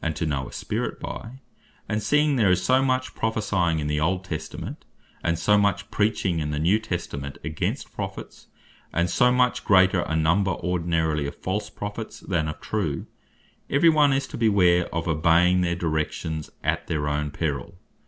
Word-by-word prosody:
&C) 80 - +1
to 80 +2 -2
know 70 -4 -2
a - - -10
Spirit - - -3
by: 115 - -6 0.5
and 105 0 -1
seeing 150 +6 +3
there 110 -6 +3
is 90 0 +2
so 130 +6 +4
much 130 -1 0
Prophecying 100 -7 0
in 75 - -2
the 75 0 0
Old 90 +4 0
Testament; 80 -4 -6 0.4
and 85 0 +1
so 105 +5 +3
much 100 +1 0
Preaching 105 -5 +1
in 75 -1 -2
the 75 - -2
New 90 +8 +3
Testament 70 -9 -5
against 80 0 -3
Prophets; - - -7 0.4
and 85 0 0
so 125 0 +4
much 125 0 +2
greater 95 -2 +4
a 80 - -2
number 85 +5 +2
ordinarily 80 -4 0
of - - -7
false 100 +3 -3
Prophets, 105 +2 -6
then 85 -5 -1
of 75 - -5
true; - - -2 0.6
every 145 +5 +5
one 150 -3 +5
is 135 +1 +1
to - - -7
beware 90 -6 +4
of 80 +1 -3
obeying 85 +3 +4
their 85 -1 0
directions, 80 -1 -2
at - - -1
their 75 -3 -1
own 75 0 -1
perill. 75 +1 -3
90 Hz, 175 wpm, -25 LUFS, 80-105 Hz, 0.6 s, every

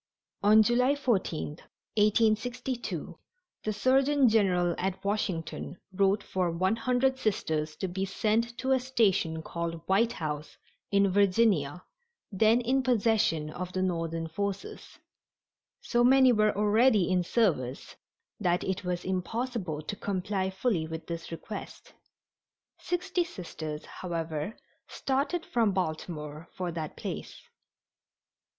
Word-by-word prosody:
On 215 +2 +7
July 250 +5 +3
14, 225 - 0 0.5
1862, 220 - 0 0.4
the 215 - -1
surgeon 265 +5 +3
general 185 -6 +3
at 190 +1 -3
Washington 185 -4 -2 0.2
wrote 195 +2 +2
for 185 -2 -1
one 185 +5 +1
hundred 255 +3 +1
Sisters 155 -8 -1
to 190 - -3
be 185 +2 -3
sent 225 +4 0
to 265 +1 -1
a 260 - +4
station 200 -11 +1
called 170 0 -4
White 225 +5 +3
House, 150 -1 -5 0.3
in 200 -1 +3
Virginia, 185 -5 +2 0.5
then 220 +4 +4
in 260 +3 +2
possession 215 -11 +2
of 180 +2 -6
the 185 - 0
Northern 165 -2 -2
forces. 200 +3 -5 0.8
So 240 -1 +1
many 260 +1 +6
were 215 -3 +2
already 210 -1 +4
in 185 -1 +2
service 165 - 0 0.4
that 175 0 +1
it 190 +1 -2
was 180 -1 -3
impossible 190 -3 -2
to 205 - -4
comply 190 -1 -2
fully 190 -4 0
with 160 0 -6
this 170 -1 -6
request. 195 +5 -8 0.9
Sixty 360 0 -1
Sisters, 160 - -7
however, 165 +1 -4 0.3
started 280 +6 -1
from 225 -4 +1
Baltimore 155 -3 -4
for 180 -2 -3
that 160 -2 -5
place. - - -6
195 Hz, 120 wpm, -29 LUFS, 170-230 Hz, 0.9 s, On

